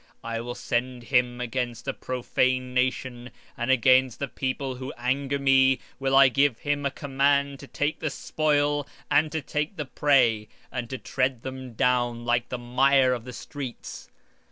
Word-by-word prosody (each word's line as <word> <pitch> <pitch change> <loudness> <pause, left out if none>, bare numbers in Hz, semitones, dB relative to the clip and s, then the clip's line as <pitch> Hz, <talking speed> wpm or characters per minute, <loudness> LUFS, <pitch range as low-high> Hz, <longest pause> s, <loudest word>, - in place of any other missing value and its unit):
20:6 115 - -6
I 115 - -2
will 120 +1 -6
send 125 0 -2
him 125 -1 +1
against 120 0 -3
a - - +1
hypocritical 130 0 0
nation, 125 -1 -2 0.3
and 120 -3 -3
against 130 -1 +4
the 140 - -3
people 130 0 -3
of 125 0 -8 0.2
my 125 +2 +1
wrath 135 -1 +2 0.2
will 135 0 +1
I 135 0 +8
give 135 0 +2
him 145 -1 -1
a - - -1
charge 140 0 0
to 140 - -11
take 145 +3 -2
the 155 - -1
spoil, 145 0 0 0.2
and 155 0 +3
to 160 0 -2
take 150 +7 -2
the 150 - -4
prey, 125 -7 +2 0.2
and 125 -2 -4
to 130 - -4
tread 130 -2 -1
them 130 -2 -7
down 120 -1 +1
like 120 0 +1
the 125 - -3
mire 130 +2 +3
of 120 -2 -5
the 125 - -8
streets. 135 -2 -8
130 Hz, 175 wpm, -26 LUFS, 125-140 Hz, 0.3 s, I